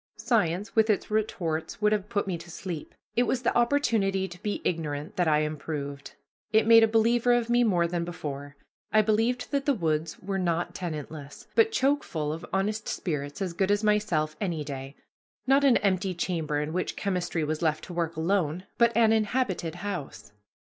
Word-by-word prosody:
Science 205 -5 0
with 220 0 +4
its 210 0 0
retorts 180 -7 -1
would 210 0 +3
have 210 -1 0
put 205 -3 0
me 190 -2 -2
to 170 +1 -10
sleep; 170 -2 -6 0.2
it 240 - +4
was 255 -1 0
the - - +1
opportunity 225 -7 +2
to 175 0 -12
be 210 -1 -2
ignorant 150 -3 -2
that 175 -2 +1
I 150 -1 +4
improved. 145 -2 -5 0.4
It 220 0 +4
made 225 0 +8
a 225 - +6
believer 230 +2 +3
of 240 -1 +1
me 240 0 +4
more 180 -7 +3
than 170 0 -1
before. 145 -4 -6 0.4
I 215 0 +5
believed 225 +4 +1
that 280 -1 -1
the 285 - +4
woods 160 -4 -1
were 195 +1 -3
not 175 -1 -1
tenantless, 155 -4 -6
but 450 -1 +4
choke 285 -6 +2
full 150 -2 -3
of 165 - -7
honest 210 +3 -1
spirits 145 -1 -3
as 180 -3 -3
good 190 +2 0
as 205 +1 +2
myself 205 -8 +1
any 170 -6 -1
day 135 -1 -7 0.5
not 270 +2 +4
an 270 -3 +6
empty 190 -2 0
chamber 165 -4 -1
in 150 +2 -3
which 185 +1 -2
chemistry 175 -4 -1
was 155 +1 -2
left 155 -2 0
to 180 - -8
work 170 -1 -2
alone, 170 0 0
but 235 -1 +4
an 225 -1 +5
inhabited 215 -7 0
house. 180 - -5
185 Hz, 190 wpm, -27 LUFS, 160-220 Hz, 0.5 s, made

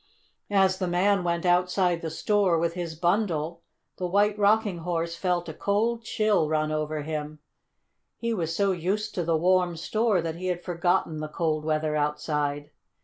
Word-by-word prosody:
As 190 -2 +3
the 185 - -1
man 185 +2 +2
went 170 0 -1
outside 180 0 +2
the 165 - -3
store 190 +1 +2
with 165 +1 0
his 170 -2 -5
bundle 170 -2 0 0.4
the 180 - -2
White 205 +3 +2
Rocking 205 -3 +3
Horse 170 0 -2
felt 175 0 -1
a 160 - -5
cold 220 +7 0
chill 215 -8 +1
run 155 0 0
over 155 0 -2
him. 155 0 -4 0.8
He 230 0 -2
was 165 -5 -2
so 200 +1 +2
used 195 +5 -2
to 175 - -1
the 165 -1 +1
warm 180 +1 +2
store 215 +3 +1
that 165 -1 -3
he 185 +1 -4
had 175 -1 -2
forgotten 175 -2 0
the 155 - -4
cold 155 -1 -1
weather 155 -1 0
outside. 150 0 -1
175 Hz, 170 wpm, -26 LUFS, 160-195 Hz, 0.8 s, As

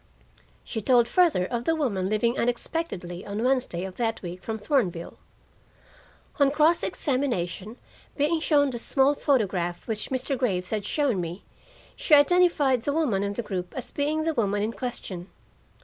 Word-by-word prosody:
She 220 - -4
told 240 +1 +4
further 315 - +3
of 240 +3 -3
the 325 - +2
woman 200 -12 -1
leaving 230 +3 +1
unexpectedly 235 - -3
on 205 +3 -4
Wednesday 250 -9 0
of 190 -1 -7
that 225 -2 -1
week 180 +1 -6
from 220 +4 -4
Thornville. 205 - -1 1.2
On 280 -1 +5
cross 310 +4 +3
examination, 235 - -2 0.4
being 305 +3 +2
shown 290 -3 +3
the 240 - -4
small 270 +4 +2
photograph 195 - 0
which 220 -2 -2
Mr. 260 +1 -1
Graves 190 -8 -1
had 210 -2 -2
shown 270 -11 +1
me, 170 +3 -6 0.5
she - - +4
identified 290 -4 +4
the 285 +4 -1
woman 280 -12 +1
in 200 0 -2
the 240 - -3
group 180 -4 -5
as 255 - -6
being 300 +2 -1
the 325 0 0
woman 205 -5 0
in 220 - -1
question. 195 -5 -5
240 Hz, 160 wpm, -26 LUFS, 195-285 Hz, 1.2 s, On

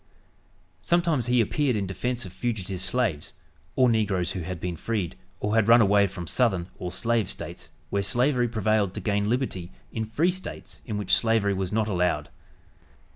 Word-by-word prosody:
Sometimes 170 - +1
he 125 -1 +4
appeared 130 +3 +1
in 100 -2 -1
defense 120 +6 -3
of 90 - -9
fugitive 95 -3 -3
slaves, 100 -6 0 0.4
or 130 - +5
negroes 100 -6 +1
who 95 - -4
had 90 +1 -5
been 90 0 -3
freed 95 -1 -2 0.2
or 105 - -1
had 110 -2 +3
run 115 +1 +8
away 100 -2 +5
from 90 -2 -7
southern 95 -4 +1
or 90 - -4
"slave" 115 +1 0
States 85 +2 -6 0.2
where 100 - +1
slavery 120 +5 +2
prevailed 110 -4 +1
to - - -3
gain 100 0 0
liberty 110 -8 -2 0.2
in 110 - -2
"free" 150 +11 +1
States 185 +1 -8
in 105 -3 -2
which 100 -2 -1
slavery 110 -3 +2
was 95 -1 -2
not 110 0 +1
allowed. 90 -3 0
105 Hz, 175 wpm, -26 LUFS, 95-120 Hz, 0.4 s, run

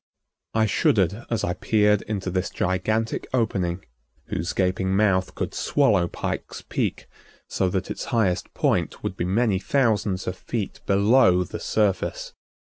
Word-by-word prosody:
I 110 0 +4
shuddered 100 +1 +1
as 115 -3 -1
I 90 - 0
peered 105 +2 +2
into 95 -4 -3
this 95 0 -1
gigantic 110 +5 -1
opening 95 -6 -1 0.4
whose 85 +3 -2
gaping 95 0 0
mouth 95 -3 +2
could - - -3
swallow 105 -12 +2
Pike's - - -5
Peak - - -2 0.4
so 95 - 0
that 95 0 -2
its - - -5
highest 110 -8 0
point - - 0
would 95 - -3
be 85 - -2
many 100 +1 +1
thousands 105 -6 +1
of 90 - -3
feet 105 +1 -4
below 100 -2 +4
the - - -7
surface. 105 -3 -1
100 Hz, 140 wpm, -24 LUFS, 95-110 Hz, 0.4 s, I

